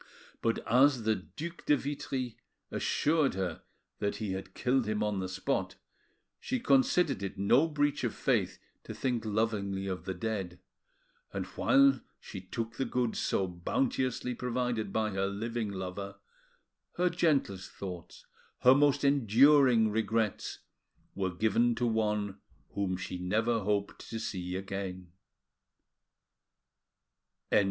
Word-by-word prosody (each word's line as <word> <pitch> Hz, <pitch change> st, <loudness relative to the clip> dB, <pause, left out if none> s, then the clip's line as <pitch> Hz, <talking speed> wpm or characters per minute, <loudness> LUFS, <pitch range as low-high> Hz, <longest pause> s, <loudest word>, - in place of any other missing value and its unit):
But 115 Hz, -, -1 dB
as 130 Hz, +1 st, +4 dB
the 110 Hz, 0 st, +3 dB
Due 155 Hz, -, -6 dB
de 145 Hz, -, +5 dB
Vitry 130 Hz, -3 st, -4 dB, 0.4 s
assured 150 Hz, -, +1 dB
her 90 Hz, -4 st, -3 dB, 0.4 s
that 100 Hz, 0 st, -1 dB
he 105 Hz, -1 st, -3 dB
had 95 Hz, 0 st, -6 dB
killed 125 Hz, -2 st, +1 dB
him 105 Hz, 0 st, 0 dB
on 105 Hz, -2 st, -1 dB
the 95 Hz, 0 st, -3 dB
spot, 95 Hz, -, -2 dB, 0.6 s
she 255 Hz, -, -2 dB
considered 235 Hz, -, +3 dB
it 100 Hz, 0 st, -4 dB
no 120 Hz, +11 st, +4 dB
breach 145 Hz, -2 st, 0 dB
of -, -, -1 dB
faith -, -, +1 dB, 0.3 s
to -, -, -7 dB
think 125 Hz, -3 st, -1 dB
lovingly 105 Hz, -3 st, -1 dB
of 90 Hz, -3 st, -4 dB
the 95 Hz, -1 st, -3 dB
dead, 95 Hz, -3 st, -3 dB, 0.7 s
and -, -, -3 dB
while 275 Hz, 0 st, +4 dB, 0.2 s
she 95 Hz, -, -8 dB
took 115 Hz, +5 st, -5 dB
the 135 Hz, -, 0 dB
goods 125 Hz, -3 st, -1 dB
so 95 Hz, -, +1 dB
bounteously 125 Hz, +8 st, -1 dB
provided 125 Hz, -3 st, -2 dB
by 110 Hz, 0 st, 0 dB
her 95 Hz, 0 st, 0 dB
living 110 Hz, +2 st, -3 dB
lover, 95 Hz, +1 st, -5 dB, 0.8 s
her 180 Hz, 0 st, +2 dB
gentlest 140 Hz, -, +1 dB
thoughts, 90 Hz, -4 st, -8 dB, 0.4 s
her 125 Hz, -, +8 dB
most 145 Hz, 0 st, +3 dB
enduring 130 Hz, -2 st, +5 dB
regrets, 110 Hz, -1 st, -1 dB, 0.5 s
were 95 Hz, -1 st, -1 dB
given 110 Hz, +6 st, +2 dB
to 120 Hz, +2 st, 0 dB
one 105 Hz, -3 st, 0 dB, 0.3 s
whom 95 Hz, -2 st, -2 dB
she 90 Hz, 0 st, -5 dB
never 110 Hz, +6 st, +1 dB
hoped 100 Hz, 0 st, -2 dB
to 115 Hz, -, -4 dB
see 90 Hz, -5 st, -4 dB
again. 95 Hz, -2 st, -5 dB
110 Hz, 130 wpm, -31 LUFS, 95-130 Hz, 0.8 s, her